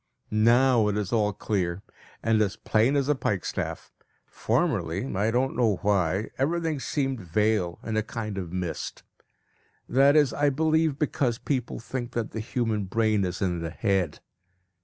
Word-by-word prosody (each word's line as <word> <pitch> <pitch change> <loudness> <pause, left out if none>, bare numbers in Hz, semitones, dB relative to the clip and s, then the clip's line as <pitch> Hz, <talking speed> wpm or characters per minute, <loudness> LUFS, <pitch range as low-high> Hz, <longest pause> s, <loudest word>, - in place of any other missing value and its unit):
Now 115 +1 +4
it 105 0 0
is 105 +1 -2
all 105 -2 +2
clear, 95 -3 -2 0.4
and 110 -1 +3
as 100 -5 0
plain 115 +6 +2
as 140 -1 +1
a 150 - +4
pikestaff. 105 - -3 0.3
Formerly 110 - -1
I 100 +3 +1
don't 125 +3 0
know 115 -5 +2
why 100 0 +1
everything 160 +1 0
seemed 135 -2 -1
veiled 95 0 0
in 110 - -3
a 110 - +2
kind 110 -2 -5
of 90 -3 -6
mist. 90 -2 -4 0.8
That 140 +3 +4
is, 150 -4 +4
I 145 0 +2
believe, 160 +1 +1
because 130 -5 0
people 130 -3 -2
think 120 +1 -5
that 115 -2 -2
the 110 - -4
human 110 -2 -1
brain 110 +1 +1
is 90 +1 -2
in 90 -2 0
the 85 0 -3
head. 95 -2 -1
110 Hz, 160 wpm, -26 LUFS, 100-130 Hz, 0.8 s, Now